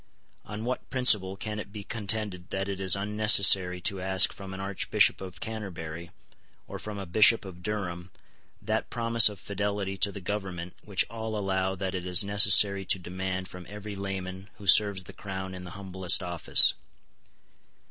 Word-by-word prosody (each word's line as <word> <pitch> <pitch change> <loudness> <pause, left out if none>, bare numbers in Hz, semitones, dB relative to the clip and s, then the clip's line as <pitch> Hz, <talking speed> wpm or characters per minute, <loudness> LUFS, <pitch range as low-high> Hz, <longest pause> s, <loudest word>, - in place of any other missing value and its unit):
On 105 +2 -7
what 125 +1 -5
principle 105 -7 +4
can 105 +1 -6
it 100 - -9
be 105 -1 -9
contended 105 -4 -5
that 95 +1 -4
it 100 -1 -5
is 95 -1 +5
unnecessary 100 -3 +4
to 95 0 -2
ask 95 0 +3
from 95 -1 -10
an 95 - -8
Archbishop 95 0 +1
of 90 -2 -10
Canterbury 85 -7 -7 0.6
or - - -8
from 105 -1 -8
a 100 - -6
Bishop 110 +4 +4
of 90 -2 -11
Durham 90 -3 -5 0.5
that - - -3
promise 115 -1 +3
of 105 -2 -11
fidelity 100 -1 -4
to 100 +1 +2
the 100 - -9
government 90 -3 -6
which 100 -3 0
all 110 -1 -6
allow 95 -1 -2
that 95 0 -5
it 90 -1 -5
is 90 +2 +4
necessary 100 -1 +4
to 95 - +1
demand 95 +1 -5
from 90 -1 -12
every 105 0 -9
layman 95 -1 -7
who 100 - -14
serves 100 +1 +4
the 95 - -13
Crown 95 -1 -7
in 90 0 -9
the - - -9
humblest 95 -2 +1
office. 85 -2 +5
95 Hz, 170 wpm, -27 LUFS, 95-105 Hz, 0.6 s, is